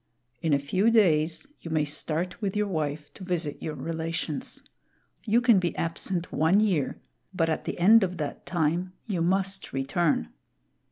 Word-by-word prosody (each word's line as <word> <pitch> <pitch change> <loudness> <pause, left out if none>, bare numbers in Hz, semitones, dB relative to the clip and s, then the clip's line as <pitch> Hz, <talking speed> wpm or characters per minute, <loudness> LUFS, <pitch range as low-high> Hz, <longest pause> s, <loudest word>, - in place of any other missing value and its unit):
In 160 - 0
a 140 - +5
few 185 +10 +1
days 165 -8 +3
you 165 - -8
may 155 -2 +1
start 155 +6 -2
with 200 -2 -2
your 210 0 +2
wife 150 -5 -3
to - - -11
visit 175 -5 -2
your 155 - -4
relations. 165 0 -4 0.6
You 230 +2 +3
can 235 -5 +5
be 175 -2 -1
absent 170 +1 -3
one 165 +6 +3
year, 190 -10 +1 0.4
but 165 -3 +2
at 160 - -2
the - - -3
end 215 +6 +7
of 180 -1 -2
that 150 -2 -5
time, 175 +2 0
you 195 -7 -2
must 195 +2 0
return. 135 - 0
170 Hz, 165 wpm, -27 LUFS, 155-195 Hz, 0.6 s, end